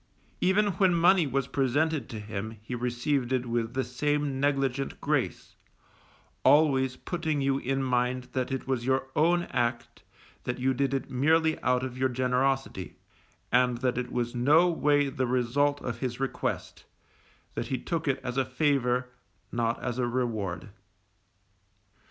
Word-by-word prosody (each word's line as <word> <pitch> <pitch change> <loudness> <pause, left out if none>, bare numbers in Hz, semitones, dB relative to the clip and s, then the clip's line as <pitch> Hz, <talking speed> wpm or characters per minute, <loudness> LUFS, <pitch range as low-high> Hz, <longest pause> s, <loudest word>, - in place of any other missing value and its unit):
Even 205 +3 +3
when 185 -3 +4
money 170 -1 +4
was 135 0 0
presented 140 +1 0
to 110 - -6
him 110 +1 -6
he 120 - -6
received 125 +2 -1
it 130 -1 +1
with 120 0 -2
the 130 - +1
same 145 +2 -1
negligent 135 -1 0
grace, - - -2 0.9
always 135 -4 +4
putting 160 -1 -2
you 135 0 +1
in 135 +1 -1
mind 125 0 0
that 130 0 -2
it 135 - -3
was 130 -3 -1
your 130 +1 0
own 175 +3 +3
act, 120 0 -2 0.4
that 125 - -3
you 130 +1 +1
did 135 +1 0
it 135 - -4
merely 160 +5 +2
out 125 0 +1
of 130 -1 -5
your 130 0 +2
generosity, 130 -4 -1 0.6
and 125 -1 +3
that 125 -1 +1
it 125 0 -3
was 120 -1 -2
no 150 +8 +4
way 145 -3 +2
the 130 -2 -2
result 130 +4 +1
of 120 -1 -4
his 125 -1 -3
request, 135 -1 -3 0.7
that - - -3
he 130 - -1
took 165 +4 -3
it 135 - +1
as 125 0 -4
a 135 - +3
favour, 130 -2 +1 0.4
not 115 -1 0
as 125 0 -2
a 125 - +1
reward. 110 -7 -2
130 Hz, 155 wpm, -28 LUFS, 125-145 Hz, 0.9 s, when